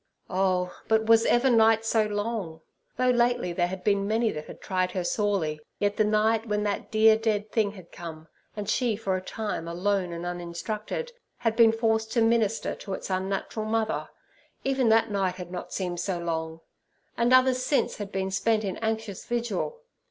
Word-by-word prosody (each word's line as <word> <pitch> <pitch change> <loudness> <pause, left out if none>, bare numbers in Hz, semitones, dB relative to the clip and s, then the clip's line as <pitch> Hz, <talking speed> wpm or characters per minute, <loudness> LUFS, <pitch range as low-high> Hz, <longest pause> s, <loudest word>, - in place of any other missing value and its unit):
Oh, 185 -1 +1
but 220 0 +3
was 225 0 +5
ever 250 +2 +4
night 225 -1 +4
so 220 -1 +2
long? 205 -6 -3 0.4
Though 255 0 +3
lately 240 -6 +1
there 175 0 +1
had 185 0 -6
been 200 0 +2
many 225 +1 +1
that 150 0 -7
had - - -10
tried 185 -1 -1
her 185 - -1
sorely, 175 -6 0 0.2
yet 205 0 0
the 215 - +4
night 215 +2 +2
when 210 -1 0
that 205 -1 -2
dear 220 0 +6
dead 215 -1 -1
thing 210 -3 +1
had 185 -4 -13
come, 160 -2 -9 0.3
and 205 -2 -5
she, 235 +1 +1
for 195 -3 -1
a 185 - -2
time 205 -3 -4
alone 180 +1 0
and 170 +1 -5
uninstructed, 175 - -4 0.3
had 225 -2 0
been 230 -1 +7
forced 220 -1 0
to 235 - +3
minister 225 -2 +1
to 195 - -7
its - - -7
unnatural 195 +3 -2
mother, 220 0 -1 0.5
even 265 -3 +2
that 225 0 +4
night 190 -3 0
had 180 -1 -8
not 180 - -6
seemed 180 -2 -3
so 180 0 -1
long; 160 -1 -3 0.5
and 235 +1 +2
others 255 0 +5
since 285 - +1
had 205 -1 -6
been 190 0 -2
spent 215 +3 +1
in 195 -3 -3
anxious 220 -3 -3
vigil. 240 - -2
210 Hz, 185 wpm, -27 LUFS, 185-225 Hz, 0.5 s, been